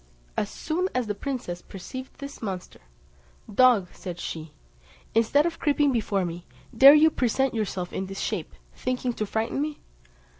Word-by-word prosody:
As 205 - -1
soon 355 +4 -2
as 255 -1 +1
the 210 - -2
princess 200 -7 -4
perceived 255 +7 -8
this 280 0 -8
monster, 190 -5 -5 0.7
"Dog," 230 -6 +5
said 175 -2 -7
she, 160 -2 -5 0.6
"instead 230 +7 +4
of 340 - -2
creeping 290 -1 +3
before 205 -5 0
me, 175 0 -6 0.3
dare 275 +5 +10
you 315 +1 +6
present 265 +1 +1
yourself 195 -5 -3
in 190 - -3
this 195 0 -6
shape, - - -3 0.2
thinking 250 -1 -2
to 215 -2 -3
frighten 225 +6 -1
me?" 300 0 -3
230 Hz, 155 wpm, -26 LUFS, 195-275 Hz, 0.7 s, dare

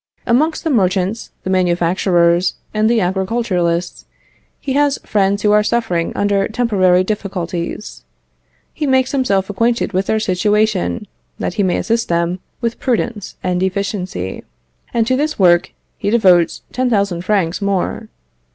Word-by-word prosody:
Amongst 305 +7 +1
the 325 - 0
merchants, 190 -1 0
the 190 - -2
manufacturers, 175 -1 +2 0.2
and 215 +1 +2
the 235 -1 +3
agriculturists, 185 -2 -1 0.5
he 270 - -3
has 285 0 +2
friends 200 0 +1
who 210 - +4
are 210 0 +5
suffering 210 -7 0
under 200 -1 +1
temporary 200 -6 +2
difficulties; 185 -2 -4 0.7
he 300 - -2
makes 260 -1 +2
himself 200 -9 +1
acquainted 230 +2 0
with 190 +2 0
their 220 - +1
situation, 210 +1 0 0.3
that - - -3
he 205 - -1
may 185 -2 +1
assist 230 0 0
them 170 +1 0 0.2
with 235 -1 -2
prudence 235 -5 -2
and 180 -1 0
efficiency, 190 - -3 0.5
and 230 -1 +1
to 255 +3 +1
this 305 +3 -1
work 175 -3 +4 0.3
he 200 - -1
devotes 185 -7 +3
10,000 200 -8 0
francs 185 -2 0
more. 200 -2 -2
200 Hz, 135 wpm, -17 LUFS, 180-230 Hz, 0.7 s, are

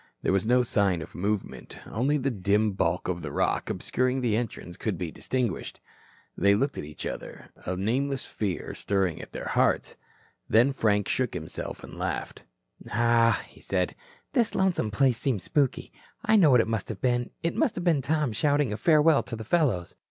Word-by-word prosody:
There - - +2
was 95 +2 +1
no 125 +1 +4
sign 100 -7 +1
of - - -13
movement. 100 +2 -3
Only 135 +7 0
the 135 -1 -1
dim 105 +1 +1
bulk 95 -1 0
of 90 -1 -2
the 75 -3 -5
rock - - 0
obscuring 130 +1 0
the 115 -4 +1
entrance 110 -6 -4
could 105 -2 -3
be 85 -2 -4
distinguished. 125 -2 -3 0.6
They 100 0 +4
looked 135 +6 -1
at - - -4
each 75 +1 -7
other, - - -7 0.2
a 90 - -1
nameless 130 +7 -1
fear 100 -5 -3
stirring 95 -4 -1
at - - -11
their - - -5
hearts. - - +1 0.5
Then 120 +5 +4
Frank 105 -5 +1
shook 125 -6 -1
himself 80 -2 -6
and - - -10
laughed. - - -4 0.4
"Pshaw," 115 0 +3 0.2
said - - -1
he, - - -20 0.4
"this 240 -5 +2
lonesome 190 - +1
place 120 +3 +2
seems 120 -10 0
spooky. 140 - 0 0.3
I 220 -1 +4
know 180 -8 +6
what 125 -3 +6
it - - -2
must 110 -3 -2
have 105 -4 -5
been. 120 -1 0
It 170 - 0
must 230 - +1
have 175 - -3
been 165 -5 +3
Tom 150 -3 0
shouting 145 -1 +1
a - - -3
farewell 155 0 +4
to 120 - -6
the 110 - -6
fellows." 120 - +1
115 Hz, 190 wpm, -27 LUFS, 100-135 Hz, 0.6 s, know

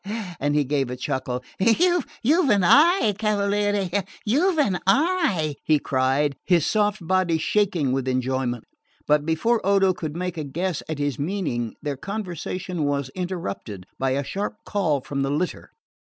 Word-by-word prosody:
And 145 +1 0
he 150 - +3
gave 135 -2 -1
a 125 - -4
chuckle. 125 0 -3 0.2
"You've 310 - +2
an 200 -4 +4
eye, 295 - +5
cavaliere, 205 -2 0 0.2
you've 320 - +2
an 200 - +2
eye," 240 - +2
he 155 - +3
cried, 135 +1 +1
his 175 -5 +3
soft 210 -4 0
body 185 -2 +2
shaking 170 -5 +1
with 130 0 -1
enjoyment; 130 -2 -1 0.4
but 150 0 +2
before 220 +9 +1
Odo 195 -1 +3
could 155 -3 -5
make 180 -2 -3
a - - -2
guess 170 +4 -3
at 155 - -3
his 145 -2 -2
meaning 145 - -2
their 145 -2 -3
conversation 185 -2 -4
was 140 -2 -1
interrupted 140 - -5
by 135 0 +1
a 140 - -1
sharp 200 - -4
call 165 -9 0
from 140 +1 -4
the 135 - 0
litter. 155 +6 -2
175 Hz, 155 wpm, -24 LUFS, 140-205 Hz, 0.4 s, eye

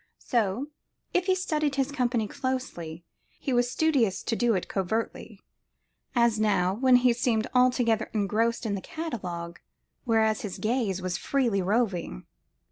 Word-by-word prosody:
So, 235 +4 -1 0.4
if 360 +1 +1
he 375 - +4
studied 305 -6 -1
his 275 0 0
company 245 -5 0
closely, 175 -12 -4 0.3
he 270 - -2
was 245 0 +2
studious 255 -8 +1
to 230 - -1
do 235 -1 +2
it 185 - -2
covertly; 205 +2 -3 0.7
as 235 -2 +3
now, 195 -4 +2
when 255 +4 +4
he 245 -1 +5
seemed 230 -2 +1
altogether 245 -3 +3
engrossed 225 +3 0
in 215 - -1
the 195 - -3
catalogue, 180 - -5 0.5
whereas 220 -2 +2
his 205 -4 -5
gaze 215 -5 -1
was 180 -1 -1
freely 235 -7 +1
roving. 190 - -1
230 Hz, 140 wpm, -27 LUFS, 200-255 Hz, 0.7 s, he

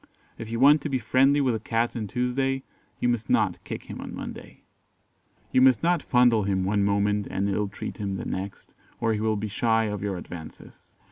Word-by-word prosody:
If 115 - -6
you 115 0 -3
want 145 +3 +6
to 150 - -3
be 135 - +1
friendly 135 +5 +3
with 130 -3 +2
a 110 - -2
cat 115 +2 -1
on 110 -3 -3
Tuesday, 130 +4 -1 0.4
you - - +1
must 120 -3 -1
not - - +1
kick - - -6
him - - -8
on - - -7
Monday. - - -9 0.9
You 130 - +4
must 130 +1 +5
not 175 -1 +2
fondle 125 -3 +4
him 95 -2 0
one 100 +1 +1
moment 100 0 +1
and 100 +1 -1
illtreat 100 0 -3
him 100 -2 -3
the - - -5
next, 95 +1 -6 0.3
or 115 -1 +1
he 105 - -2
will 110 0 +1
be 105 +1 -3
shy 115 +1 +1
of 105 -2 -3
your 100 -2 -2
advances. 85 -2 -11
110 Hz, 205 wpm, -26 LUFS, 100-125 Hz, 0.9 s, want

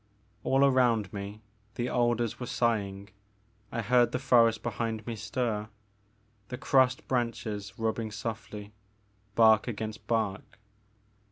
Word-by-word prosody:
All 135 +1 +4
around 120 -7 +3
me 100 +2 -6 0.3
the 120 - -1
alders 120 -2 0
were 125 - -5
sighing; 100 -5 -1 0.6
I 115 -1 -2
heard 120 +3 +3
the - - +1
forest 115 -4 +4
behind 110 -1 -3
me 115 - -4
stir; 110 0 -2 0.8
the 125 - -5
crossed 130 -1 +2
branches 110 -5 -2
rubbing 110 0 -1
softly, 105 -1 -6 0.6
bark 110 -1 +5
against 110 -2 -5
bark. 110 -4 -2
115 Hz, 115 wpm, -29 LUFS, 105-120 Hz, 0.8 s, bark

